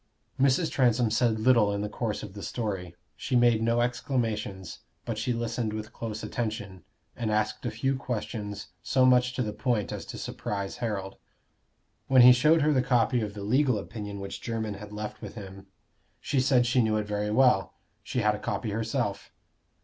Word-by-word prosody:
Mrs. 140 +5 +3
Transome 120 -3 +2
said 110 0 +2
little 115 -3 +4
in 100 0 -2
the 105 - -2
course 110 0 -3
of 95 - -8
the 100 - -8
story: 95 -7 -4 0.2
she 130 - -3
made 120 -2 +4
no 115 +1 +2
exclamations, 115 -6 -2 0.3
but 115 -2 -3
she 120 +3 -1
listened 115 -1 -2
with 110 0 -6
close 110 -2 -5
attention, 105 -6 -4 0.3
and 115 -2 -2
asked 105 +3 -1
a - - 0
few 135 +5 -1
questions 105 -5 -5
so 130 -1 +3
much 125 -1 +4
to 125 - -1
the 105 -2 -3
point 115 -2 -1
as - - -5
to - - -7
surprise 100 -1 -4
Harold. 100 -4 -3 0.9
When 130 -2 +7
he 125 - +10
showed 150 +5 +4
her 150 0 +3
the 130 - +3
copy 125 -1 +2
of 105 -1 -4
the 100 - -6
legal 125 +3 +2
opinion 105 0 -6
which 100 0 -6
Jermyn 110 -3 -3
had 105 0 -10
left 105 0 -6
with 105 -2 -8
him, 95 -2 -10 0.5
she 140 - 0
said 130 -2 +3
she 125 +1 +3
knew 110 -1 +1
it 105 - -1
very 105 0 -2
well; 105 - +3 0.3
she 125 - -2
had 105 0 +3
a 105 - -5
copy 110 - -3
herself. 110 +1 -2
110 Hz, 190 wpm, -28 LUFS, 105-125 Hz, 0.9 s, he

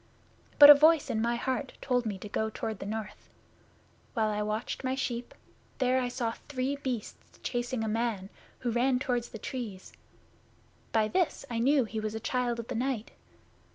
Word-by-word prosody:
But 290 0 +12
a - - +14
voice 310 +1 +4
in 220 - 0
my 235 +1 +1
heart 255 +1 -2
told 245 -3 0
me 205 -3 -3
to 200 - -8
go 220 +2 -1
toward 220 -1 -4
the - - -6
north. 215 -1 -6 0.9
While 220 -2 +2
I 210 0 -1
watched 215 +5 -3
my 260 0 0
sheep 245 -2 -3 0.5
there 255 0 +2
I 250 - -1
saw 240 -2 -2 0.2
three 270 0 -1
Beasts 250 -6 -6
chasing 245 -1 -2
a - - -1
man, 215 -3 -2 0.3
who 245 -2 -1
ran 250 +2 +2
toward 245 -2 -1
the 225 - -9
Trees. 215 -5 -6 1.0
By 220 -1 +3
this 355 +1 0
I 230 - -1
knew 270 +3 +4
he 220 0 -4
was 215 0 -3
a - - -3
Child 245 +1 -1
of 235 -1 -6
the 255 - -4
Night. 240 -2 -2
240 Hz, 185 wpm, -30 LUFS, 220-260 Hz, 1.0 s, a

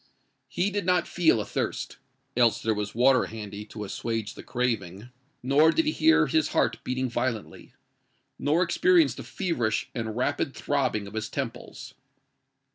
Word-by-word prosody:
He 195 +3 -1
did 205 0 -1
not 180 0 +2
feel 165 -9 +3
athirst—else 115 +2 -2
there 110 - +2
was 105 0 -4
water 130 +1 +4
handy 105 -2 -7
to 105 0 -8
assuage 110 +1 -3
the - - -10
craving:—nor 125 - -1
did 325 - +1
he 305 - +2
hear 320 +1 +4
his 320 -1 +1
heart - - +1
beating 130 +1 -1
violently, 120 -2 -4 0.6
nor 155 +5 +2
experience 335 - +3
the - - -8
feverish 125 - -2
and 110 -2 -4
rapid 140 +1 -1
throbbing 130 -7 -1
of 100 - -10
his 110 -1 -3
temples. - - -6
125 Hz, 140 wpm, -27 LUFS, 110-160 Hz, 0.6 s, water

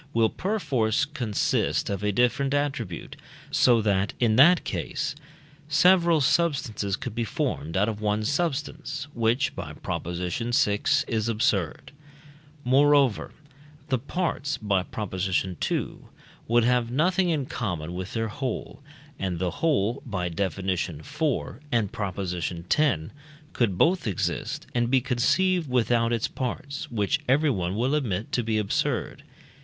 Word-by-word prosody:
will 115 -1 +4
perforce 145 - 0
consist 125 -9 0
of 100 -1 -2
a 105 - +2
different 125 +6 +1
attribute, 130 - -3 0.4
so 120 -3 +4
that, 100 -1 +1
in 115 -3 +3
that 170 +8 +6
case, 150 -1 -3 0.6
several 170 +1 +5
substances 130 - +1
could 120 +1 -6
be 115 +1 -1
formed 80 -6 -2
out 100 +2 +3
of 110 -2 -3
one 105 0 0
substance, 145 0 -2
which 120 +3 +1
(by 80 -5 -6
Prop. - - -4
vi.) 100 +5 0 0.3
is 110 0 -1
absurd. 105 - 0 0.7
Moreover, 140 -1 +3 0.6
the 130 -2 +1
parts 145 0 -2
(by 100 -5 +1
Prop. 105 +2 -6
ii.) 95 -1 -1 0.6
would 120 +1 +4
have 125 -1 +2
nothing 180 +8 +2
in 150 -5 0
common 90 -10 -4
with 95 +1 -5
their 115 -1 -1
whole, 130 +4 -5 0.4
and 95 -2 -2
the 90 0 -1
whole 125 - 0
(by 90 -7 -3
Def. 95 +4 -2
iv. 95 -2 -1 0.8
and 115 -5 +1
Prop. 100 -4 -4
x.) 90 - -1 0.7
could 105 -7 +1
both 175 - +3
exist 100 - -2
and 120 -1 +1
be 130 +1 +4
conceived 155 +7 +1
without 120 -1 +2
its 115 -1 0
parts, 140 +2 -5
which 105 -4 0
everyone 125 - +2
will 125 +6 0
admit 115 -9 -1
to 125 - +1
be 110 -1 -1
absurd. 105 -2 -1
115 Hz, 135 wpm, -26 LUFS, 100-140 Hz, 0.8 s, that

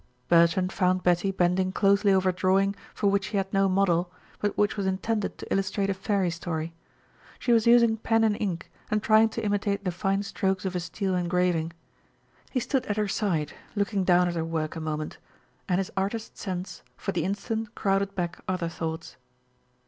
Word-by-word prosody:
Bertrand 170 +2 +4
found 185 -1 +1
Betty 180 +2 +2
bending 185 0 +1
closely 200 +1 +3
over 190 -1 +3
a - - 0
drawing 195 +2 +2 0.2
for - - -3
which 200 -1 +3
she 210 - -1
had 195 0 -2
no 195 0 +3
model, 180 -2 +2 0.3
but 205 - -1
which 210 0 +2
was 200 -2 -1
intended 200 +3 -1
to - - -4
illustrate 195 +1 0
a - - +1
fairy 195 -2 0
story. 165 -1 -4 0.6
She 245 - -1
was 230 -1 +4
using 235 -1 +6
pen 225 0 +2
and 215 -2 +3
ink, 185 -4 -3 0.2
and 215 0 0
trying 220 0 +5
to 220 - -4
imitate 205 -1 0
the 180 - +1
fine 195 +3 0
strokes 190 -1 -1
of 185 -1 -2
a - - +1
steel 190 +2 -2
engraving. 175 -2 0 0.8
He 255 - 0
stood 260 +1 -1
at 205 - -1
her 210 -1 +1
side, 175 -7 -1 0.2
looking 200 -1 0
down 180 -1 +4
at 175 - -1
her 165 -1 -1
work 160 -1 -3
a - - -4
moment, 155 -1 -4 0.5
and 180 - +3
his 195 -1 -2
artist's 200 +4 -3
sense 185 -2 -5 0.2
for 195 - -3
the - - -1
instant 220 +3 -3
crowded 195 -1 0
back 175 -1 -3
other 180 -2 -1
thoughts. 165 0 -5
195 Hz, 190 wpm, -27 LUFS, 180-205 Hz, 0.8 s, using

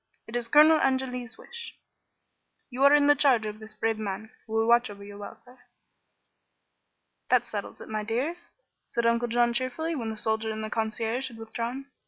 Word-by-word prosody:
It 220 - -7
is 240 -1 -1
Colonel 305 +5 +7
Angeli's 255 -3 -1
wish. 470 0 -9 0.9
You 255 +2 -1
are 280 - +8
in 290 -1 +4
the 290 - +7
charge 260 -6 +4
of 210 0 -5
this 215 0 -10
brave 225 0 -1
man, 215 +1 -5 0.2
who 220 - -8
will 225 0 +2
watch 235 0 +4
over 200 -1 -10
your 205 0 -10
welfare." 245 +5 -12 1.6
"That - - +4
settles - - -6
it, - - -9
my 215 -1 -3
dears," 290 +11 -3 0.4
said 235 0 -1
Uncle 235 +1 +2
John, 240 0 +2
cheerfully, 255 +7 -2
when 235 -7 -3
the 220 - -4
soldier 220 +1 0
and 220 0 -4
the 215 - -5
concierge 225 +3 -1
had 235 -3 -11
withdrawn. 235 +4 -5
235 Hz, 185 wpm, -27 LUFS, 220-260 Hz, 1.6 s, are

